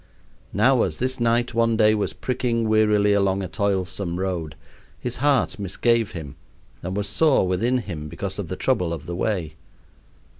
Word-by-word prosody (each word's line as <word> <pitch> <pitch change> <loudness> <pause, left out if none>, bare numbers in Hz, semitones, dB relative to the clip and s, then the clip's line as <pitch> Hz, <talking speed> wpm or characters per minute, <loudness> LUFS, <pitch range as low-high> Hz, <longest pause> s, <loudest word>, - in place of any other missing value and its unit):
Now, - - +3
as - - -1
this 130 +1 -2
knight 120 +1 +1
one 115 0 +2
day 110 -1 +5
was 105 -2 -1
pricking 120 -3 -1
wearily 105 -1 +3
along 100 -1 +1
a - - -3
toilsome 95 -2 -2
road, 85 -5 -3 0.4
his 125 0 -4
heart 135 -5 +1
misgave 115 +3 +1
him 75 -6 -8 0.4
and 95 +3 -4
was 105 - 0
sore 150 -12 +3
within 115 +8 +1
him 85 -11 -5
because - - -5
of - - -3
the - - -4
trouble 85 -2 0
of 85 - -7
the 85 - -5
way. 85 -6 -2
105 Hz, 165 wpm, -23 LUFS, 90-115 Hz, 0.4 s, day